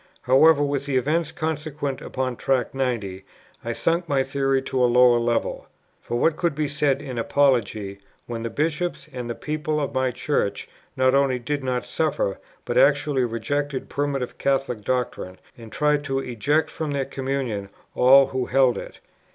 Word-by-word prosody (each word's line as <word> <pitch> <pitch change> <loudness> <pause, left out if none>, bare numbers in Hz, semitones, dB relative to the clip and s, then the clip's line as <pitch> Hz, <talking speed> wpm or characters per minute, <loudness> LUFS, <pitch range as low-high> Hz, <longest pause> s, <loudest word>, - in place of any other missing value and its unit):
However, 145 +4 +5
with 140 -1 -2
the 135 -2 +1
events 155 +5 0
consequent 150 -4 -3
upon 130 -1 -3
Tract 130 +1 0
90, 115 -8 -2 0.4
I 115 - -2
sunk 170 +6 0
my 135 -2 +2
theory 135 0 0
to 130 -1 0
a 125 - +4
lower 125 0 +5
level. 120 0 -1 0.3
For 120 - -3
what 160 +3 +2
could 170 -4 0
be 150 0 0
said 145 -1 0
in 130 -4 -5
apology, 115 -7 +1 0.3
when 115 -1 -5
the 115 - -3
Bishops 155 +2 -2
and 125 -2 -5
the 120 - -3
people 155 0 -2
of 145 - -3
my 130 0 +1
Church, 125 -4 -2 0.3
not 130 0 +3
only 135 -2 +3
did 140 +3 -3
not 125 -1 -1
suffer, 160 - -1 0.3
but - - +1
actually 145 - +3
rejected 135 +4 -3
primitive 140 -3 -2
Catholic 135 -5 0
doctrine, 120 -6 -2 0.2
and 115 -2 -12
tried 150 +1 +1
to 135 -1 -1
eject 135 +5 0
from 160 -2 -4
their 140 -1 -1
communion 130 -7 -3 0.2
all 135 +2 +7
who 130 -2 -3
held 130 -2 +3
it? - - -10
135 Hz, 165 wpm, -24 LUFS, 125-145 Hz, 0.4 s, all